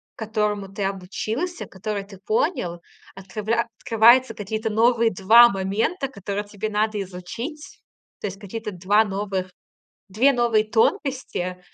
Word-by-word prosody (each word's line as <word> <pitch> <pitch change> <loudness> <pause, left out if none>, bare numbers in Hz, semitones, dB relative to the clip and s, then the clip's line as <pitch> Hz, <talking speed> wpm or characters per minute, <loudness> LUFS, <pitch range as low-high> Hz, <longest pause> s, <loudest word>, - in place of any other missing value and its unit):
которому 210 -2 -2
ты 200 +1 -4
обучился, 215 - -3
который 200 +1 -5
ты 195 -1 -14
понял, 355 - -1 0.3
открывля 215 +4 -2
открываются 235 +3 +5
какие-то 220 +2 -3
новые 230 +1 +3
2 225 +6 +7
момента, 200 - -1
которые 200 -3 -4
тебе 205 +1 -5
надо 215 0 0
изучить. 195 - -7 0.4
То - - -3
есть 195 0 -8
какие-то 215 +1 -6
2 200 +4 +3
новых 195 -2 -3 0.6
2 235 +9 +3
новые 235 -4 +2
тонкости. 225 - -1
215 Hz, 125 wpm, -23 LUFS, 195-235 Hz, 0.6 s, 2